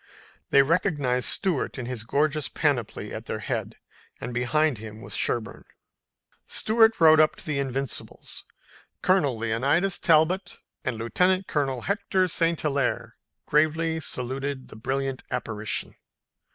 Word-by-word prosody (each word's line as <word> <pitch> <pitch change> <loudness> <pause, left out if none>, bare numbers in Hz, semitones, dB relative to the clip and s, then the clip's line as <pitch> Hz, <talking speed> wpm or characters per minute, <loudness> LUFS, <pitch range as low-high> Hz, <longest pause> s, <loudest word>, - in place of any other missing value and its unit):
They 140 - +6
recognized 145 -6 +1
Stuart 180 -8 +1
in 130 - -4
his 120 -3 -4
gorgeous 150 +4 0
panoply 140 -8 -1
at - - -7
their - - -2
head - - -4 0.4
and 125 - -5
behind 125 +2 +1
him 110 0 -9
was - - -8
Sherburne. 115 -2 -1 0.8
Stuart 225 0 +3
rode 160 -1 +7
up 155 0 +4
to - - -11
the 150 -3 -1
Invincibles. 135 -2 -4 0.6
Colonel 150 -10 +3
Leonidas 135 - +1
Talbot 175 +3 +2 0.3
and 130 -5 -2
Lieutenant 180 - +1
Colonel 135 -6 -1
Hector 195 - 0
St. 165 -1 +1
Hilaire 140 -4 -1 0.3
gravely 160 +2 +2
saluted 135 -1 -4
the - - -11
brilliant 135 +3 -2
apparition. 110 -4 -2
140 Hz, 125 wpm, -26 LUFS, 125-165 Hz, 0.8 s, rode